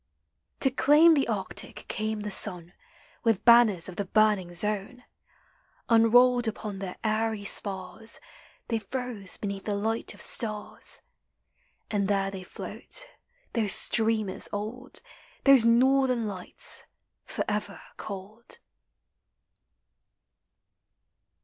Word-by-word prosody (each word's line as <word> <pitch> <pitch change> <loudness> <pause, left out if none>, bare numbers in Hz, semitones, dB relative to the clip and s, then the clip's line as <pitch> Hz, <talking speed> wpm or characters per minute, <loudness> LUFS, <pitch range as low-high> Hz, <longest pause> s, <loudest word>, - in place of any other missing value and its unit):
To 265 - +5
claim 300 +5 +6
the 280 -3 +2
Arctic 200 -5 -4
came 215 0 -2
the 210 0 -4
sun 175 -2 +1 0.5
With 225 -4 +1
banners 235 -7 +6
of 185 - -9
the 205 - -1
burning 210 -3 +2
zone. 210 +6 -3 0.9
Unrolled 240 +1 +5
upon 210 -2 -4
their 190 -2 -5
airy 220 -1 0
spars, 200 +3 -4 0.5
They 230 -1 0
froze 220 -3 -6
beneath 200 -1 -5
the 205 - -1
light 220 +3 -2
of - - -13
stars; 215 -2 -4 0.9
And 200 -2 +1
there 195 -1 +1
they 190 -1 -7
float, - - -6 0.5
those 215 -5 0
streamers 220 -4 -1
old, 220 +6 -6 0.4
Those 275 -4 +7
Northern 255 0 +4
Lights, 205 - -3 0.4
forever 210 -1 -3 0.2
cold 215 - -8
215 Hz, 105 wpm, -28 LUFS, 200-240 Hz, 0.9 s, Those